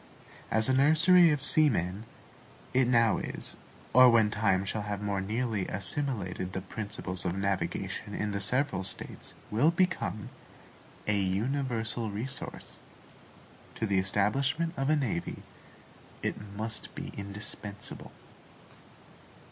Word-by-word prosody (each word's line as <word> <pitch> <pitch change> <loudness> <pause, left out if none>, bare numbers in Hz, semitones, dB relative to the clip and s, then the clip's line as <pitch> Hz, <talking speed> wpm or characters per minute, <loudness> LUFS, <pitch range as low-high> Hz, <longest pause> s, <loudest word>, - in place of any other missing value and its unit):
As 110 0 +2
a 130 - +2
nursery 165 +6 +6
of 145 -3 0
seamen, 110 - +5 0.7
it 130 -1 +3
now 115 -3 +3
is, - - -4 0.4
or 125 +1 +8
when 110 -3 +4
time 95 -3 +1
shall 105 +2 -3
have 105 -1 -4
more 100 -1 -2
nearly 110 0 -2
assimilated 95 -3 -3
the 95 - -3
principles 95 -2 -5
of 90 0 -2
navigation 95 +1 -3
in 105 0 -2
the 100 - -2
several 125 -2 +1
States, 95 - -6 0.2
will 120 +9 +4
become, 170 - -1 0.8
a 105 -1 +1
universal 115 +3 -1
resource. 115 +7 0 1.0
To 115 - -2
the 100 -3 +2
establishment 135 - 0
of 135 +1 -1
a 155 - +4
navy, 120 - -3 0.8
it - - -1 0.2
must 110 +1 -2
be - - -6
indispensable. 100 +1 -6
110 Hz, 120 wpm, -29 LUFS, 100-130 Hz, 1.0 s, or